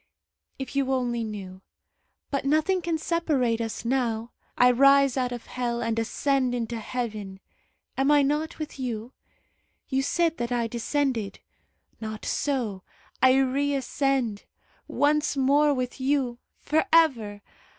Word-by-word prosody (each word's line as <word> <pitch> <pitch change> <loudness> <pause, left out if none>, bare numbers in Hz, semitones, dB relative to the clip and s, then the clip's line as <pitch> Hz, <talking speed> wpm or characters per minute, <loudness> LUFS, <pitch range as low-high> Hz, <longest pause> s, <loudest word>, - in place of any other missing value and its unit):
If 265 +1 -7
you 275 -1 +1
only 240 -2 -1
knew 195 -4 -7 0.7
but 275 - -1
nothing 310 +7 +2
can 335 -1 -1
separate 295 -9 0
us 225 0 -4
now. 235 -2 -1 0.3
I 250 0 +6
rise 275 +1 +5
out 250 -2 0
of 240 -1 -6
hell, 240 -1 -2
and 230 0 0
ascend 255 +2 0
into 235 -1 -3
heaven. 215 -5 -5 0.6
Am 270 +1 +3
I 295 -1 +5
not 300 +3 -1
with 305 -3 -7
you? 240 -1 -4 0.8
You 265 -1 +1
said 330 +3 +1
that 240 0 -3
I 240 -1 +1
descended. 235 -1 -1 0.6
Not 215 -1 -6
so; 240 -9 -1 0.4
I 260 0 +6
reascend. 270 -4 0 0.4
Once 295 0 +1
more 285 +3 +4
with 255 -1 -3
you! 260 -3 0 0.2
For 310 +1 +1
ever! 230 -11 +3
255 Hz, 130 wpm, -26 LUFS, 230-285 Hz, 0.8 s, I